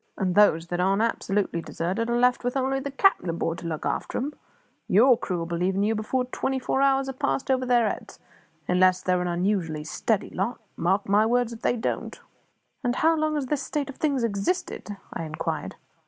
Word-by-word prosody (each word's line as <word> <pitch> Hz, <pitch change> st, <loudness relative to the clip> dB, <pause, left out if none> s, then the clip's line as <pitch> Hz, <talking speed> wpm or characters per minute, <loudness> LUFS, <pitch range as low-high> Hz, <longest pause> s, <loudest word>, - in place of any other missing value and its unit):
And 185 Hz, -3 st, 0 dB
those 175 Hz, -5 st, +5 dB
that 175 Hz, -, -2 dB
aren't 195 Hz, +4 st, +2 dB
absolutely 200 Hz, -6 st, -1 dB
deserted 185 Hz, +8 st, -2 dB
are 240 Hz, -, +1 dB
left 250 Hz, +1 st, +3 dB
with 245 Hz, +2 st, -1 dB
only 270 Hz, +1 st, 0 dB
the 280 Hz, +1 st, -4 dB
cap'n 275 Hz, -, +2 dB
aboard 165 Hz, 0 st, -2 dB
to 170 Hz, -, -6 dB
look 160 Hz, -2 st, -4 dB
after -, -, -2 dB
'em. 285 Hz, +4 st, -2 dB, 0.5 s
Your 245 Hz, +6 st, +6 dB
crew'll 180 Hz, -6 st, -3 dB
be 170 Hz, 0 st, -3 dB
leaving 190 Hz, +3 st, +1 dB
you 215 Hz, +2 st, +2 dB
before 225 Hz, +4 st, -1 dB
twenty 265 Hz, +1 st, -2 dB
four 265 Hz, +1 st, 0 dB
hours 270 Hz, -1 st, +3 dB
are 270 Hz, -, -3 dB
passed 275 Hz, 0 st, -1 dB
over 255 Hz, -1 st, +1 dB
their 240 Hz, -2 st, +4 dB
heads -, -, -5 dB, 0.5 s
unless 185 Hz, 0 st, +3 dB
they're 180 Hz, -1 st, +1 dB
an 180 Hz, -, -1 dB
unusually 175 Hz, -3 st, -1 dB
steady 205 Hz, +6 st, -1 dB
lot 240 Hz, -, -2 dB, 0.2 s
mark 190 Hz, +4 st, 0 dB
my 205 Hz, +2 st, +4 dB
words 240 Hz, 0 st, +1 dB
if 230 Hz, -, -10 dB
they 245 Hz, -, +1 dB
don't." 225 Hz, -, -3 dB, 0.6 s
"And 245 Hz, -1 st, 0 dB
how 325 Hz, +4 st, +3 dB
long 310 Hz, -1 st, 0 dB
has 290 Hz, -3 st, -1 dB
this 285 Hz, +1 st, -1 dB
state 290 Hz, -2 st, -3 dB
of -, -, -17 dB
things 280 Hz, -5 st, 0 dB
existed?" 205 Hz, -, -2 dB, 0.2 s
I -, -, -4 dB
inquired. 155 Hz, -1 st, -4 dB
225 Hz, 200 wpm, -26 LUFS, 185-260 Hz, 0.6 s, Your